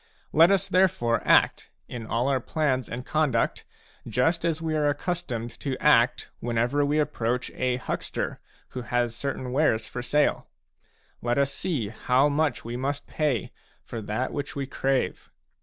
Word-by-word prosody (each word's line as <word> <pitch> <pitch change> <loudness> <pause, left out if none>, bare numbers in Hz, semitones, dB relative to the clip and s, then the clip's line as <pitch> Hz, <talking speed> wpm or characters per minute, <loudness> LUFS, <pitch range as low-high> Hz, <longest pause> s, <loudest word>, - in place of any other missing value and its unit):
Let 165 +3 +7
us 195 0 +2
therefore 180 -12 +2
act, - - +4 0.2
in 115 -2 -7
all 120 +4 0
our 135 -2 +2
plans 130 -2 -1
and 125 +2 -5
conduct, 145 -7 0 0.4
just 125 +10 +1
as 165 -2 0
we 160 -1 -2
are 150 -1 +2
accustomed 145 -7 -3
to 135 -3 -3
act 125 -5 +3
whenever 120 +4 +1
we 145 +1 +1
approach 125 -5 -1
a 125 -1 0
huckster 125 - -3 0.3
who 125 - -5
has 120 0 -1
certain 130 -1 -3
wares 120 -6 +2
for 125 - -5
sale; 145 +4 +1 0.7
let 120 +1 0
us 140 0 +2
see 145 - -2
how 125 +5 +2
much 145 -4 0
we 120 +1 -4
must 140 +3 -2
pay 145 -9 -1 0.3
for 115 - -6
that 110 +5 -2
which 145 -1 -4
we 140 -1 -2
crave. 135 0 -1
130 Hz, 155 wpm, -26 LUFS, 120-150 Hz, 0.7 s, Let